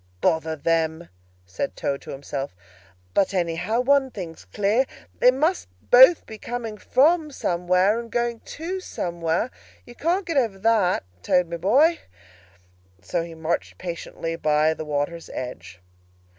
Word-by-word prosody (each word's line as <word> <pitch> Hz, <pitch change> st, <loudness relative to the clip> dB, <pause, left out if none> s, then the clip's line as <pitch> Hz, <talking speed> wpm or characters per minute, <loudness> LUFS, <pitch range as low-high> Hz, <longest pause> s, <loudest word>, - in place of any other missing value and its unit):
"Bother 160 Hz, -, +1 dB
them!" 165 Hz, +1 st, 0 dB, 0.4 s
said 95 Hz, +9 st, -4 dB
Toad 140 Hz, 0 st, -2 dB
to -, -, -12 dB
himself. 140 Hz, -4 st, -5 dB, 0.6 s
"But, 195 Hz, 0 st, +2 dB
anyhow, 180 Hz, +7 st, 0 dB
one 275 Hz, +1 st, +3 dB
thing's 175 Hz, -8 st, -8 dB
clear. 210 Hz, +6 st, +1 dB, 0.3 s
They 250 Hz, -, +7 dB
must 305 Hz, +8 st, +1 dB, 0.2 s
both 260 Hz, +7 st, +8 dB
be 220 Hz, -1 st, -10 dB
coming 235 Hz, -2 st, -5 dB
from 305 Hz, -, +3 dB
somewhere, 185 Hz, -2 st, +1 dB
and 235 Hz, -1 st, -8 dB
going 235 Hz, -1 st, -1 dB
to 345 Hz, +10 st, -5 dB
somewhere. 170 Hz, -, -2 dB, 0.3 s
You 240 Hz, -, -12 dB
can't 350 Hz, +9 st, 0 dB
get 330 Hz, -4 st, -2 dB
over 225 Hz, -7 st, +1 dB
that. 205 Hz, -, +2 dB, 0.2 s
Toad, 180 Hz, -, +2 dB
my 170 Hz, -, -2 dB
boy!" 275 Hz, -, +4 dB, 1.0 s
So 165 Hz, -, -1 dB
he 165 Hz, 0 st, -7 dB
marched 160 Hz, +1 st, -2 dB
on -, -, -34 dB
patiently 170 Hz, -2 st, -5 dB
by 155 Hz, 0 st, +2 dB
the 155 Hz, -, -7 dB
water's 150 Hz, +3 st, -3 dB
edge. 110 Hz, -8 st, -7 dB
185 Hz, 145 wpm, -24 LUFS, 165-250 Hz, 1.0 s, both